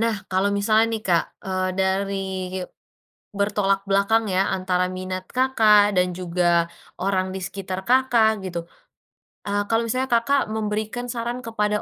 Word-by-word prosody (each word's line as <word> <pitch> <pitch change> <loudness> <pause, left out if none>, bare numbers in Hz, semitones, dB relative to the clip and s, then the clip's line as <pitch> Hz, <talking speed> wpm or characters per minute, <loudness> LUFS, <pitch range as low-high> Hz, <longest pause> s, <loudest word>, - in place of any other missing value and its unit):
nah 230 -1 +1 0.2
kalau 190 +2 +2
misalnya 215 +2 +3
nih 220 - -2
Kak, 170 -2 +3 0.2
eee, 185 -1 -1
dari, 195 +1 0 1.2
bertolak 200 -1 +1
belakang 200 +3 +3
ya 185 - +3 0.2
antara 185 -1 0
minat 185 0 -4
Kakak, 215 -6 +4
dan 180 0 +2
juga 175 -1 +1 0.3
orang 185 0 0
di 190 - -4
sekitar 185 0 -5
Kakak, 245 -3 +4
gitu, 175 -2 -3 0.9
ah, 205 0 0
kalau 225 0 +2
misalnya 255 +3 -1
Kakak, 255 +5 +3
memberikan 220 +3 -3
saran 240 +1 -3
kepada 210 -3 -1
200 Hz, 135 wpm, -23 LUFS, 185-225 Hz, 1.2 s, Kakak